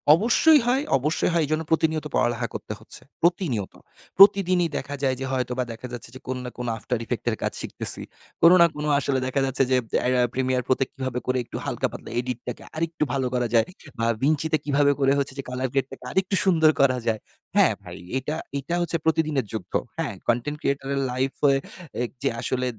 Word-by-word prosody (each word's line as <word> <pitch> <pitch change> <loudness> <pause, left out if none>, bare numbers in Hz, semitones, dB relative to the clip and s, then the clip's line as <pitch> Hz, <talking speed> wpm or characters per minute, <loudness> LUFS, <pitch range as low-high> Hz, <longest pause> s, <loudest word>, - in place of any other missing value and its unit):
অবশ্যই 265 - +5
হয়, 265 +3 +2
অবশ্যই 150 +6 0
হয় 165 -2 +3
এজন্য 155 +2 -1
প্রতিনিয়ত 160 -1 +1
পড়ালেখা 120 -1 +1
করতে - - -5
হচ্ছে। - - -11 0.2
প্রতিনিয়ত। 160 - 0 0.4
প্রতিদিনই 185 -3 +6
দেখা 145 0 -4
যায় 130 -1 +2
যে, 135 - -3
হয়তোবা 125 -1 -1
দেখা 115 +3 -7
যাচ্ছে 120 - -7
যে, - - -8
কোন 130 0 -2
না - - -4
কোন 125 -1 -4
আফটার 120 +2 -3
ইফেক্ট - - -4
এর - - -1
কাজ - - 0
শিখতেছি। - - +2 0.4
কোন 170 +1 +8
না - - +9
কোন 150 0 -4
আসলে 135 -1 0
দেখা 135 +1 0
যাচ্ছে 135 0 +1
যে, 130 - +5 0.2
অ্যা - - -1
অ্যা 125 - +3
প্রিমিয়ার 130 -1 0
প্রত্যেক 130 0 +1
কিভাবে 130 -2 -3
করে 130 0 +1
একটু - - -7
হালকা - - -1
পাতলা - - -9
এডিট 125 -1 -3
টাকে 125 - -5
আরেকটু 160 -1 -1
ভালো 130 -2 0
করা 125 -1 +1
যায়। 115 - +5 0.3
বা 115 - +1 0.2
ভিঞ্চিতে 155 +1 +2
কিভাবে 145 0 +3
করে 135 0 +3
হচ্ছে 135 -1 -1
যে, - - -3
কালার 125 0 -2
গ্রেট 135 -1 +1
টাকে 130 -1 -10
আরেকটু 190 +1 +1
সুন্দর 160 -4 +5
করা 130 -2 +4
যায়। 110 -1 +1 0.4
হ্যাঁ, - - +5
ভাই, - - -9 0.2
এটা, 150 +4 -3 0.2
এটা 155 +6 -3
হচ্ছে 170 -1 0
প্রতিদিনের 155 -6 +1
যুদ্ধ। 110 -5 -6 0.2
হ্যাঁ? - - -2
কনটেন্ট 120 +6 0
ক্রিয়েটর 140 0 -1
এর 135 - 0
লাইফে, 135 +2 +1 0.5
এক 120 - -3
যে, 135 - +3
আসলে 130 0 -1
135 Hz, 200 wpm, -24 LUFS, 125-160 Hz, 0.5 s, না